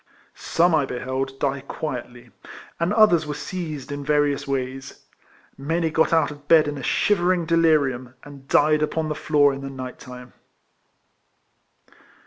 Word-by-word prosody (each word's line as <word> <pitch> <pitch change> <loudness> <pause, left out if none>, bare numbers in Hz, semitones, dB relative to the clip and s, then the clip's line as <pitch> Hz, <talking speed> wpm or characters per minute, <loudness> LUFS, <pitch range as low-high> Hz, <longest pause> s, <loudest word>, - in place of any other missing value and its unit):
Some 170 +1 +1
I 150 -4 +2
beheld 130 +2 -4
die 140 -1 -1
quietly, 125 -4 -6 0.5
and 170 +3 0
others 190 -8 +4
were 150 - -4
seized 155 -3 -6
in 145 0 -5
various 145 -1 +1
ways. 135 0 -5 0.5
Many 160 +3 -1
got 160 +1 +2
out 160 -3 +2
of 145 0 -13
bed 160 -2 +5
in 145 -1 -4
a - - -7
shivering 180 +2 +1
delirium, 145 -7 +1
and 140 -2 -13
died 150 +2 +3
upon 155 +1 -1
the - - -1
floor 145 -2 +2
in 135 - -7
the 135 - -6
night 130 -2 -8
time. 125 0 -11
145 Hz, 145 wpm, -23 LUFS, 135-160 Hz, 0.5 s, bed